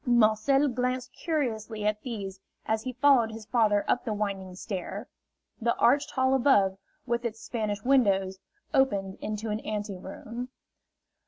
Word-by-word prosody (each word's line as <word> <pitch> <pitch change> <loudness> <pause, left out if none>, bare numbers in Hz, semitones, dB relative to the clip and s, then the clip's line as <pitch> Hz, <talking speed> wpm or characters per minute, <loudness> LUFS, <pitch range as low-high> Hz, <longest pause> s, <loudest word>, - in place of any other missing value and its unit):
Marcel 240 +4 +4
glanced 250 0 -2
curiously 225 -9 -2
at 210 0 0
these 200 -6 -5 0.3
as 220 0 0
he 255 +2 -4
followed 250 -3 +4
his 220 -1 -8
father 210 -3 +2
up 245 - +1
the 225 - -2
winding 195 -3 -3
stair. 200 +3 -5 0.5
The 235 +1 +2
arched 280 +4 +3
hall 260 0 +2
above, 205 -8 +4 0.3
with 235 -1 -1
its 225 -2 -3
Spanish 210 -4 -3
windows, 195 -8 +3 0.3
opened 200 -9 +1
into 215 +1 -3
an 210 - -1
anteroom. 210 +4 -5
220 Hz, 140 wpm, -28 LUFS, 205-250 Hz, 0.5 s, Marcel